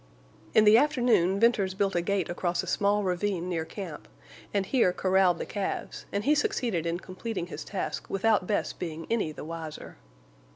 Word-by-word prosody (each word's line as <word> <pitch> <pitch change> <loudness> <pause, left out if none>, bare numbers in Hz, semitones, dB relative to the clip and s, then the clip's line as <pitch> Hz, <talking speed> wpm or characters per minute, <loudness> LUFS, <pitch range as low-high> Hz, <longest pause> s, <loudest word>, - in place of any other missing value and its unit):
In 215 - +7
the 215 +2 +8
afternoon 245 - +2
Venters 205 -5 +3
built 195 0 +1
a 175 - +2
gate 190 -1 0
across 175 0 -1
a - - -6
small 205 +1 +1
ravine 180 -1 -1
near 165 -3 -2
camp, 175 -4 -8 0.4
and 200 -1 0
here 230 -4 +3
corralled 185 -1 +3
the - - -4
calves; 200 -2 -4
and 200 +1 -1
he 290 - +4
succeeded 240 - 0
in 170 +1 -1
completing 185 +1 -5
his 175 - -7
task 195 - -4
without 200 -1 +2
Bess 210 - 0
being 165 -2 -6
any 215 -9 +1
the 150 - -8
wiser. 160 -1 -7
190 Hz, 175 wpm, -28 LUFS, 175-210 Hz, 0.4 s, the